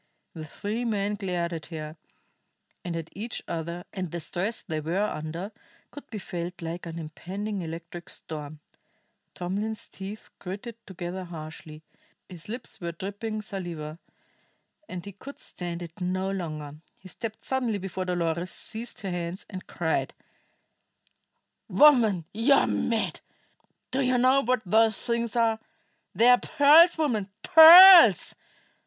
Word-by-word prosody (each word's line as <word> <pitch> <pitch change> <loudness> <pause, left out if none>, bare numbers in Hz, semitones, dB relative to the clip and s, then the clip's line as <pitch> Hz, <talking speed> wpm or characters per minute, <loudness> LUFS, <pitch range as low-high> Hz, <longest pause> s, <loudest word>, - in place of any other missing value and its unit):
The 155 -2 -8
three 210 - -4
men 210 -3 -1
glared 180 -4 -3
at 160 -2 -6
her, 155 -2 -7 0.9
and 175 -2 -4
at 165 -1 -6
each 220 +3 -5
other, 170 +1 -4
and 185 -3 -4
the 170 - -5
stress 190 +7 -2
they 155 -1 -4
were 175 +7 0
under 165 +2 -5 0.4
could 290 - -12
be 220 - -6
felt 175 -2 -5
like 170 +1 -5
an 165 0 -7
impending 190 +6 -5
electric 170 +2 -8
storm. 150 -1 -8 0.7
Tomlin's 205 +5 -4
teeth 195 +3 -9
gritted 205 +5 -7
together 185 0 -6
harshly, 155 -2 -10 0.4
his 180 0 -9
lips 235 -2 -6
were 170 -1 -4
dripping 210 +4 -5
saliva, 170 -6 -6 0.9
and 180 0 -7
he 200 - -7
could 265 +9 -11
stand 175 -1 -6
it 170 +2 -11
no 185 +2 -1
longer. 155 -6 -5 0.2
He 190 - -13
stepped 220 +4 -7
suddenly 250 -5 -1
before 190 -1 -5
Dolores, 175 -1 -1
seized 230 +6 -6
her 195 -3 -4
hands, 175 +2 -5
and 185 -2 -8
cried: 160 -2 -2 1.5
"Woman, 230 - +5
you 230 +7 +3
are - - +4
mad! 225 -2 -1 0.7
Do 265 +2 0
you 255 -1 +2
know 260 +2 +4
what 250 -1 0
those 220 +3 +3
things 235 -1 -2
are? 225 -2 +2 0.6
They 235 - +4
are 245 0 +7
pearls, 315 +4 +6
woman, 230 -11 -1
pearls! 330 - +9
190 Hz, 140 wpm, -26 LUFS, 170-225 Hz, 1.5 s, pearls